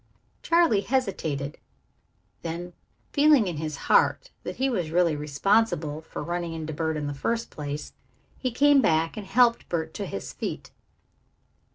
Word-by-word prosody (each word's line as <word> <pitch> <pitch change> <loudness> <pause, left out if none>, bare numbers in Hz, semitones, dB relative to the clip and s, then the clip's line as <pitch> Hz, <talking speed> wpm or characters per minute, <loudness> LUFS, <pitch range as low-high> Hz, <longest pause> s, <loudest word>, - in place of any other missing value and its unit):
Charley 335 -12 +3
hesitated. 165 - -2 0.8
Then, 175 +2 -5 0.4
feeling 290 -5 +5
in 175 -4 -3
his 155 -1 -4
heart - - +3
that - - -6
he 265 - +1
was 185 -11 -1
really 170 -1 +2
responsible 155 +1 +1
for 160 - -7
running 170 0 -3
into 160 -1 -5
Bert 160 +1 -1
in 150 - -3
the 145 - -3
first 230 +11 -2
place, 145 0 -5 0.5
he 255 - 0
came 280 +3 +5
back 160 -4 +2
and 210 -3 -7
helped 240 +2 +3
Bert 160 -2 -2
to 200 - -4
his 100 - -6
feet. - - -5
170 Hz, 150 wpm, -26 LUFS, 155-230 Hz, 0.8 s, feeling